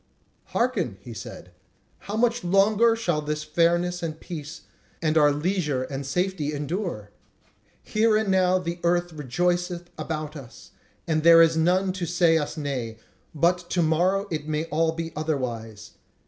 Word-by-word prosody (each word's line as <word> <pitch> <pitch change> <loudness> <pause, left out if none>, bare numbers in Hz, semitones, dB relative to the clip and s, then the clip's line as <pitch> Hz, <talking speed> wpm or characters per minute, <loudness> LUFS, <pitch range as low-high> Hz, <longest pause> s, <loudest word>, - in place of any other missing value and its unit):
"Hearken!" 205 - -1
he 120 - -9
said; - - -9 0.6
"how 205 - -2
much 235 0 +1
longer 205 +5 +4
shall 175 -9 -1
this 150 0 -3
fairness 175 +3 +1
and 160 -2 -4
peace, 160 -1 -8 0.4
and 155 -1 0
our 150 -2 +5
leisure 150 -3 -1
and 135 +1 -5
safety 175 -1 -1
endure? 145 - -4 0.7
Here 215 0 +2
and 215 -2 -1
now 185 -1 +3
the 175 -1 -4
earth 175 0 +1
rejoiceth 175 +5 -2
about 155 -1 -4
us, 135 -5 -12 0.4
and 160 -1 +1
there 165 +1 +8
is 165 0 +3
none 185 +4 +2
to 180 -2 -4
say 170 -1 +3
us 150 - -4
nay; 130 -7 -4 0.4
but 175 +3 +1
to 175 - +1
morrow 180 +5 +2
it 155 -2 -3
may 155 +1 -1
all 160 +1 +2
be 165 0 -5
otherwise. 120 -8 -4
165 Hz, 150 wpm, -25 LUFS, 150-180 Hz, 0.7 s, there